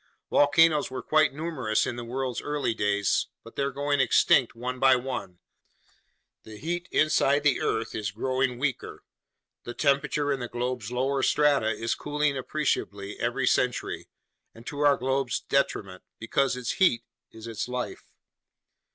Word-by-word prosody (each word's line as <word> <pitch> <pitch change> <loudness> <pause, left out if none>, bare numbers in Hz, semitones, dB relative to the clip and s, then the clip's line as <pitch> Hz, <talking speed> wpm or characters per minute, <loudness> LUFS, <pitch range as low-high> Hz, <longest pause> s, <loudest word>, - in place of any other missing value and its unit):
Volcanoes 150 +1 +4
were 130 - -6
quite 155 0 +3
numerous 140 -8 -1
in - - -3
the 120 - -6
world's 125 +1 -3
early 145 -5 -1
days, 100 -2 +1 0.2
but 115 - -14
they're 140 0 0
going 145 +1 -1
extinct 130 -2 +4
one 125 +2 -4
by 135 0 +6
one; 125 -8 -5 1.0
the 110 -1 -11
heat 175 +7 -3
inside 145 -2 +3
the 145 -3 +2
earth 110 0 -1
is 105 -2 -2
growing 130 +4 -1
weaker, 135 -1 -3 0.6
the 120 - -7
temperature 145 +1 +1
in 135 - -1
the 120 - -4
globe's 120 -2 -4
lower 135 +2 0
strata 145 -5 +3
is 115 +1 -1
cooling 150 -1 -1
appreciably 125 -7 -2
every - - -1
century, - - 0 0.5
and 115 +1 -14
to 145 - -6
our 145 -1 +4
globe's 130 -1 -1
detriment, 100 -9 -1 0.2
because 125 +3 0
its 125 -2 -2
heat 185 - +2 0.3
is 110 0 -12
its 115 -1 -4
life." 125 0 -5
130 Hz, 150 wpm, -27 LUFS, 115-145 Hz, 1.0 s, by